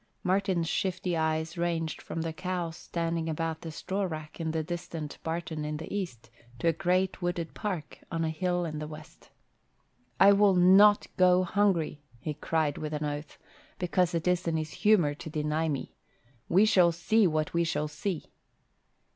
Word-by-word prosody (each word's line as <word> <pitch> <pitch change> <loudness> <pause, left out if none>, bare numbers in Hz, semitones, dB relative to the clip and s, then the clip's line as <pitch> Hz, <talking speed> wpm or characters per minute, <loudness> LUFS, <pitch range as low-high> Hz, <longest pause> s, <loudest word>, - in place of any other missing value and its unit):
Martin's 185 -2 +1
shifty 180 +1 -1
eyes 160 +1 -1
ranged 165 -2 -1
from 165 - -4
the 165 -1 -3
cows 180 -2 -3
standing 165 -1 -2
about 160 0 -2
the 165 - -6
straw 190 +5 -3
rack 155 -5 -5
in 165 - -2
a 160 - 0
distant 165 -2 -6
barton 160 -1 -3
in 150 0 -3
the 160 +4 -7
east 125 - -5 0.3
to 170 - -1
a 165 - +4
great 185 +3 0
wooded 175 -2 -2
park 180 -8 -4
on 165 -1 -1
a 160 - 0
hill 175 +1 -1
in 155 -2 -4
the 150 - -5
west. 155 +1 -12 0.9
"I 200 +1 +8
will 200 -1 +5
not 195 +4 +6
go 185 0 +5
hungry," 180 -6 +1 0.2
he 155 - -3
cried 150 0 -1
with 155 0 -4
an 150 0 -2
oath, 145 +1 -5 0.4
"because 180 -1 +1
it 165 +1 -1
is 180 0 +2
his 160 -2 -1
humour 190 -9 +3
to 150 - -8
deny 155 +1 -1
me. 140 -3 -4 0.6
We 195 +5 +5
shall 180 -5 +5
see 190 +5 +3
what 155 -2 -1
we 170 0 +2
shall 150 -2 -1
see." 155 +3 -4
165 Hz, 170 wpm, -29 LUFS, 155-180 Hz, 0.9 s, I